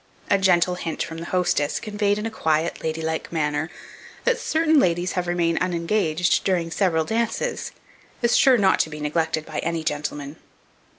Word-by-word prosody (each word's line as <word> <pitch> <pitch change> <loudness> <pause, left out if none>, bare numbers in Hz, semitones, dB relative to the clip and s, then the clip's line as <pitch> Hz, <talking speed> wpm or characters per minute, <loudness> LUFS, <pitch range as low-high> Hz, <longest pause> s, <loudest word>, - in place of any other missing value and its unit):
A 200 - +5
gentle 180 -2 +3
hint 170 -2 -3
from 165 0 -7
the 165 - -6
hostess, 175 -5 0
conveyed 205 -1 0
in 210 - -4
a 225 - -3
quiet 160 -5 0
ladylike 160 0 -3
manner, 150 -1 -1 0.5
that - - +2
certain 320 -1 +3
ladies 175 -3 +1
have 180 -1 -2
remained 170 -1 +1
unengaged 180 -1 +1
during 175 -4 0
several 160 -2 +1
dances, 230 - -2 0.5
is 235 - +3
sure 260 -2 +6
not 195 -3 +3
to - - +1
be 150 0 -8
neglected 155 +1 -1
by - - -5
any 165 -1 -2
gentleman. 145 -1 -4
170 Hz, 165 wpm, -23 LUFS, 160-200 Hz, 0.5 s, sure